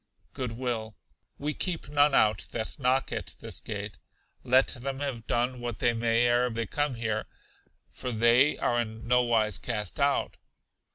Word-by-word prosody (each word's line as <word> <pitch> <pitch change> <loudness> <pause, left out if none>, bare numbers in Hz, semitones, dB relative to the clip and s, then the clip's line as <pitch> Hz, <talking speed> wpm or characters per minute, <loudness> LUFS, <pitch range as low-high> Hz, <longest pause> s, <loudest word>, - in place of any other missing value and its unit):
Good 125 -3 -3
will. 115 -3 -3 0.4
We 150 +1 -2
keep 175 -3 -2
none 145 0 +3
out 105 -2 +3
that 110 +5 -5
knock 130 0 +1
at - - -4
this - - -6
gate, 100 -4 -6 0.4
let 130 +1 +4
them 135 +2 -4
have 130 -6 -4
done 125 +1 0
what 120 -3 -4
they 120 -1 +2
may 115 0 +2
ere 120 +1 +3
they 115 0 -2
came 145 +4 -1
here; 110 -2 -2 0.6
for 125 - -6
they 120 +5 +4
are 120 0 +1
'in 110 -1 -7
no 125 +1 +4
wise 110 -5 +1
cast 105 -2 -2
out.' 140 0 +1
120 Hz, 165 wpm, -28 LUFS, 110-130 Hz, 0.6 s, let